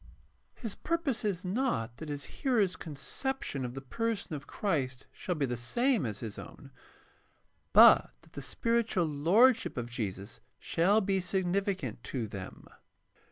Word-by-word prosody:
His 225 -5 -5
purpose 325 -8 -1
is 195 -3 -1
not 180 - -1
that 160 - -7
his 145 -1 -4
hearers' 215 -9 +1
conception 170 - -4
of 125 0 -5
the 135 - -6
person 225 - -2
of 145 -1 -6
Christ 130 -11 -2
shall 180 - -3
be 145 -3 0
the 125 -2 -2
same 225 - +1
as 105 -2 -5
his 110 -4 -6
own, - - -11 1.0
but - - +8
that - - -22
the 145 - -6
spiritual 225 - 0
lordship 175 - +3
of 120 0 -4
Jesus 105 -3 -4 0.2
shall 195 +6 +2
be 195 -1 +1
sig 185 +1 -1
nificant 185 - -1
to 125 -2 -4
them. 95 -3 -8
175 Hz, 150 wpm, -31 LUFS, -, 1.0 s, but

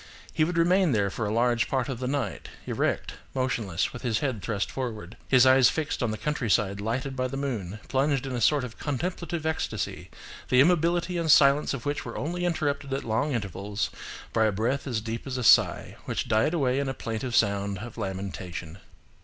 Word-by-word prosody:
He 155 - +2
would 170 +2 -1
remain 175 -1 +4
there 100 -3 +1
for 110 0 -2
a - - -2
large 120 0 +2
part 130 -3 0
of 130 -3 -4
the 130 - -2
night, 130 -8 -3 0.2
erect, - - -1 0.2
motionless, 115 -9 -1
with 125 - -7
his 120 -4 0
head 125 -4 -2
thrust 105 -1 -2
forward, 110 -8 -5
his 130 -1 +6
eyes 130 -1 +6
fixed 155 -3 -2
on 120 - +1
the 110 - -3
countryside 105 -9 0
lighted 130 +5 -2
by 130 0 0
the 135 +2 -5
moon, 110 -8 -3
plunged 135 0 +1
in 135 - -4
a 120 - -2
sort 145 +3 +3
of 120 -3 -8
contemplative 170 +3 -3
ecstasy, 160 0 -3 0.4
the 125 - +4
immobility 170 +3 +3
and 165 -2 +2
silence 140 0 +5
of 120 - -8
which 145 0 -1
were 115 - -6
only 175 +5 -2
interrupted 145 -5 -1
at 135 - -3
long 115 +7 0
intervals 100 -1 -3 0.4
by 110 -1 +3
a 110 - +3
breath 120 +8 -1
as 115 -5 -1
deep 115 +3 -5
as 130 -1 -3
a 125 - -2
sigh, - - +4
which - - -2
died 115 +8 +2
away 135 -4 +1
in 140 -1 -1
a 135 - -3
plaintive 115 +2 -3
sound 100 -2 +1
of 115 +5 -8
lamentation." 95 -4 -5
125 Hz, 200 wpm, -27 LUFS, 110-145 Hz, 0.4 s, his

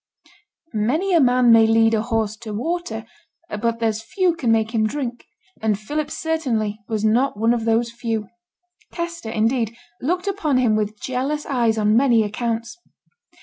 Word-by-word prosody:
'Many 290 - 0
a 340 - +6
man 250 -2 +4
may 225 -1 +7
lead 225 0 +4
a 220 - +2
horse 225 -2 -1
to 220 -2 -7
water, 245 -4 -3 0.4
but 230 +2 -1
there's 225 -1 -1
few 355 - 0
can 250 -8 0
make 225 -1 +2
him 215 -1 +2
drink,' 245 -1 -5 0.3
and 215 -2 +1
Philip 295 +7 -3
certainly 245 -12 -1
was 220 -2 -1
not 235 +2 +2
one 225 +2 +3
of 230 -2 -2
those 230 +1 +1
few. 230 -3 -3 0.6
Kester, 340 -7 -5
indeed, 225 +1 0 0.2
looked 360 +7 -1
upon 330 -9 0
him 240 -4 +3
with 210 0 -2
jealous 270 +4 -2
eyes 235 -5 +1
on 210 0 +3
many 240 -3 +4
accounts. 230 +7 -3
230 Hz, 160 wpm, -22 LUFS, 220-275 Hz, 0.6 s, may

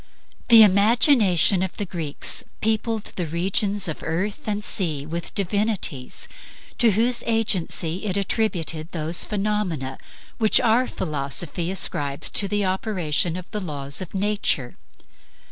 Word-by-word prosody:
The 225 -2 +9
imagination 205 - +4
of 190 -1 -3
the 205 - -2
Greeks 165 -6 -1 0.2
peopled 220 0 -1
all - - -4
the 175 -3 -2
regions 195 +4 +1
of 160 - -5
earth 190 +8 -3
and 210 0 -2
sea 155 -7 0
with 165 +2 -4
divinities, 200 - -2 0.5
to 230 -4 +5
whose 235 +4 +1
agency 190 -5 -1
it 195 -1 -1
attributed 180 -6 -1
those 165 0 0
phenomena 195 -10 -2 0.4
which 220 -2 +5
our 240 +3 +2
philosophy 155 +2 -3
ascribes 150 -7 -1
to 200 - +5
the 205 0 0
operation 185 -4 -1
of 185 - -10
the 210 - -4
laws 145 -4 -4
of 185 +1 -8
nature. 195 -11 0
190 Hz, 130 wpm, -23 LUFS, 165-210 Hz, 0.5 s, The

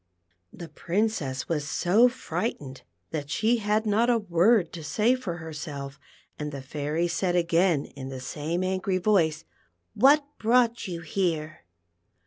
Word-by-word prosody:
" 90 0 -44
The 170 - -9
Princess 165 - -2
was 150 -3 -2
so 210 +11 +4
frightened 150 - -4 0.3
that 145 -3 -4
she 220 +9 +2
had 215 0 0
not 220 +3 +2
a 240 - +4
word 190 -1 +2
to 165 - -7
say 215 - +2
for 225 -10 -4
herself, 150 -4 -7 0.4
and 150 0 -4
the 140 -2 -7
Fairy 150 +5 -2
said 175 +1 -1
again 170 -2 +2
in 130 0 -9
the 130 -1 -6
same 155 +6 -3
angry 185 0 0
voice: 175 -5 +1 0.3
" - - -49
What 280 +7 +5
brought 235 0 +2
you 170 -2 -5
here 160 - -2
175 Hz, 150 wpm, -26 LUFS, 150-215 Hz, 0.4 s, What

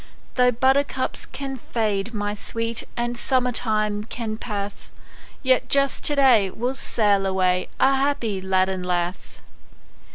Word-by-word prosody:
Though 250 -1 +4
buttercups 265 +2 +1
can 270 -1 -5
fade, 215 -3 -1
my 205 -2 -2
sweet, 230 +2 -3
And 240 0 -1
summer 250 +1 +1
time 215 -3 0
can 225 -1 -4
pass, 205 -3 -5 0.5
Yet 260 -1 +2
just 275 -1 +2
to 295 - 0
day 245 -8 +5
we'll 245 +7 -2
sail 205 -6 +1
away, 185 -1 +1
A 270 0 +4
happy 245 -8 0
lad 190 0 +2
and 190 -1 -3
lass. 180 0 -3
225 Hz, 135 wpm, -23 LUFS, 200-255 Hz, 0.5 s, day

